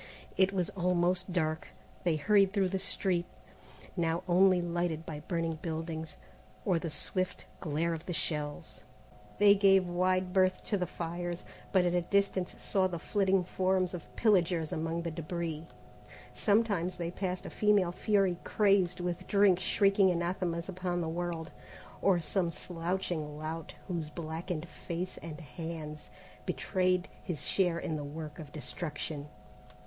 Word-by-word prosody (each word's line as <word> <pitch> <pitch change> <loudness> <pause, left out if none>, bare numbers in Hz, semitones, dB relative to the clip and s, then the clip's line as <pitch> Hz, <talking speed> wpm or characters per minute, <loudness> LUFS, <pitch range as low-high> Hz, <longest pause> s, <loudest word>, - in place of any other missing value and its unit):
It 190 0 +4
was 185 -3 0
almost 180 0 +1
dark. 155 -3 0 0.4
They 170 -3 +3
hurried 195 +4 +4
through 195 -3 +2
the 190 +1 -1
street, 180 -2 0 0.7
now 165 -1 0
only 185 +1 +5
lighted 175 -2 -1
by 150 -2 -5
burning 165 0 -2
buildings, 160 -1 -4 0.5
or 180 -4 +3
the 165 - -3
swift 185 +5 -2
glare 165 0 0
of 160 0 -6
the 180 - -2
shells. 145 -9 -3 0.5
They 205 0 +8
gave 195 -2 +5
wide 185 +1 +1
berth 185 -1 +3
to 205 - +1
the 180 - 0
fires, 175 +1 -4 0.3
but 185 -2 +4
at 175 - +2
a 175 - +3
distance 195 0 +1
saw 190 -2 +2
the 175 -2 -4
flitting 195 +1 +2
forms 185 0 +1
of 175 -3 -8
pillagers 175 -7 +3
among 165 +1 -2
the 170 - -2
débris. 165 0 -4 0.7
Sometimes 200 -4 +2
they 170 -1 -3
passed 185 0 -3
a - - -6
female 205 -4 +3
fury 195 -2 +2
crazed 195 -4 +3
with 175 -1 -3
drink 200 -3 +5
shrieking 195 +1 +4
anathemas 170 -1 -1
upon 180 -2 -2
the 165 - -1
world, 165 -2 -3 0.5
or 190 -3 +4
some 170 +2 0
slouching 170 -3 -3
lout 155 +1 -5
whose 165 -4 -2
blackened 165 +1 -4
face 175 +2 -5
and 160 -1 -7
hands 155 -5 -7 0.4
betrayed 185 -1 +1 0.2
his 170 -4 -3
share 180 -3 +2
in 160 - -2
the 145 - -4
work 150 +1 -7
of 150 -2 -8
destruction. 150 -1 -5
175 Hz, 145 wpm, -32 LUFS, 165-185 Hz, 0.7 s, They